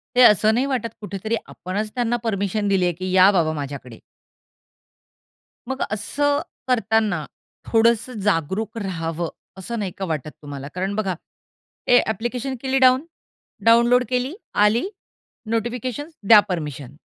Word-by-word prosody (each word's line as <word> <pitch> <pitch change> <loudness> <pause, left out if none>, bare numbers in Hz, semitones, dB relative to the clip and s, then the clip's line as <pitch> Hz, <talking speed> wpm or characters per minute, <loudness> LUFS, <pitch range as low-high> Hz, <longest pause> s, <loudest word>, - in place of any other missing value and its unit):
ते 250 - +5
असं 215 +1 +5
नाही 250 +4 +1
वाटत 255 -4 -1
कुठेतरी 205 +2 -3
आपणच 205 +4 -4
त्यांना 240 -1 +1
परमिशन 205 -1 -1
दिली 195 -2 +2
आहे, 175 - +1
की 185 +2 -5
या 185 +1 +7
बाबा 165 -5 +1
माझ्याकडे? 140 -5 -7 1.7
मग 265 0 -3
असं 285 +8 0 0.3
करताना 220 -8 +1 0.5
थोडंस 230 +1 +3
जागरूक 205 +4 -1
रहावं, 170 -5 -3 0.3
असं 230 +5 -5
नाही 195 -3 -3
का 195 - -3
वाटत 155 -3 -3
तुम्हाला? 140 -2 -7
कारण 190 +2 -2
बघा 195 -4 -1 0.7
ए 245 - +7
ॲप्लिकेशन 240 +4 -3
केली 265 0 0
डाउन 260 +2 +5 0.6
डाउनलोड 235 +2 +5
केली. 255 +3 -1 0.3
आली, 230 - +2 0.6
नोटिफिकेशन्स, 245 +6 -3
द्या 220 -1 +10
परमिशन. 145 -6 -5
215 Hz, 130 wpm, -22 LUFS, 180-240 Hz, 1.7 s, द्या